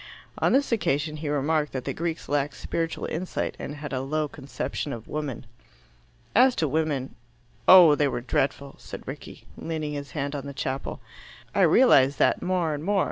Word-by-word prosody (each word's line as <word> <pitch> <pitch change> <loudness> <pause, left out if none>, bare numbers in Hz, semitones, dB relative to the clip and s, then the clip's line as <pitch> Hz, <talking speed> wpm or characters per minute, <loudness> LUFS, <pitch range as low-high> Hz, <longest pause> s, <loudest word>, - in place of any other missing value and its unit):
On - - +2
this 275 0 +2
occasion 155 -7 0
he 150 -1 -4
remarked 150 +1 0
that 130 -2 -4
the - - -2
Greeks 165 0 -4
lacked 145 -1 0
spiritual 165 -1 -3
insight, 180 +3 -3
and 145 - -5
had 145 -2 -7
a 130 - -1
low 150 +3 -1
conception 140 +1 -5
of 115 -2 -8
woman. 150 -5 -4 0.9
"As 255 +3 +5
to 160 - 0
women 145 -3 -1 0.5
oh! 180 -3 +10
there 150 - +5
they 145 - +3
were 120 - -2
dreadful," 135 +2 -1
said - - -10
Rickie, - - -9
leaning 155 -2 -4
his 145 -1 -5
hand 140 0 -2
on 140 -1 -5
the 140 - -8
chapel. 135 0 -4 0.5
"I - - +2
realize 140 - +5
that - - +2
more 180 -3 0
and 145 0 -5
more. 200 +2 +1
150 Hz, 185 wpm, -26 LUFS, 140-165 Hz, 0.9 s, oh